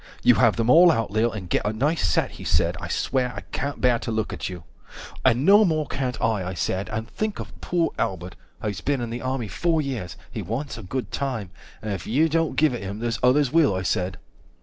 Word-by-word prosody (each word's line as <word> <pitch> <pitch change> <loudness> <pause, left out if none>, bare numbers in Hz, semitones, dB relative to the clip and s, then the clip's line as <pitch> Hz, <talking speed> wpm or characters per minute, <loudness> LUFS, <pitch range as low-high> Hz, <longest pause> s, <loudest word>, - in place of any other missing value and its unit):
You - - +7
have - - +4
them 115 -1 0
all 170 +7 +8
out, 115 -9 -1
Lil, 110 +2 +2
and 100 -5 -6
get - - 0
a 105 - 0
nice 145 +9 0
set, 80 -3 +1
145 - - -12
He - - -7
said, - - +1
I - - -5
swear, 125 -2 -1
I - - -5
can't 140 +1 -3
bear 125 -2 +3
to - - -5
look 110 -1 -2
at - - -4
you. 90 -2 -8 0.6
And 125 +5 +3
no 205 +3 +7
more 155 -5 +1
can't 130 -2 -3
I, 110 -4 +1
I 90 +1 -4
said, 95 +3 -2
and 110 0 -3
think 215 - -3
of - - -9
poor 170 -2 0
Albert, 90 -2 -2 0.3
He's 105 -2 -3
been 140 -2 0
in 120 -1 -4
the 120 +1 -4
army 130 -3 -2
four 165 - 0
years, 125 - -4
he - - -4
wants 135 +7 -4
a 115 - -8
good 125 +7 -4
time, 125 -9 -3 0.3
And 105 -1 -2
if 95 - -6
you 150 +8 +3
don't 165 +1 0
give 150 -3 +3
it 120 - -4
him, 100 +1 -5
there's 115 0 -2
others 130 +2 +3
will, 160 - +4
I 95 - -2
said. 90 0 -1
120 Hz, 240 wpm, -24 LUFS, 105-145 Hz, 0.6 s, all